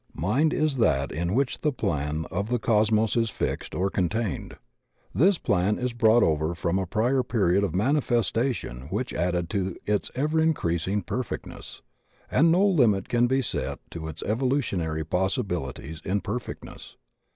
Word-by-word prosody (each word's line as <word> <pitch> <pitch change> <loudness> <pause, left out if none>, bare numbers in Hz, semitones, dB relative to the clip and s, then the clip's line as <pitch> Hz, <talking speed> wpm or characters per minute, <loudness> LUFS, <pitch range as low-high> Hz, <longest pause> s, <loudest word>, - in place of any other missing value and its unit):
Mind 130 - +1
is 155 -3 0
that 70 - +2
in 85 +5 -1
which 135 0 0
the 150 - +2
plan 75 - -2
of 100 +5 -2
the 125 - +2
Cos 110 -2 +2
mos 110 0 +2
is 115 -1 +2
fixed - - -3
or 95 +2 0
contained. 100 +2 -2 0.6
This 185 +6 +4
plan 100 - +1
is 125 -1 -2
brought 120 0 +4
over 80 +2 +1
from 85 +3 0
a 95 - -2
prior 120 +8 +1
period 100 -6 +1
of 95 -5 -1
manifestation 120 - 0
which 105 +6 -3
added 90 -1 0
to 95 -3 -2
its 105 -1 0
ever 155 +4 +1
increasing 100 - 0
perfectness, 125 +6 -6 0.5
and 165 +5 +4
no 185 +4 +4
limit 120 - +3
can 120 0 +3
be 130 +1 +1
set 70 - -2
to 80 -1 -6
its 80 0 -7
evolutionary 105 - 0
possibilities 90 - -2
in 100 +2 -1
perfectness. 115 +4 -7
105 Hz, 155 wpm, -26 LUFS, 85-125 Hz, 0.6 s, This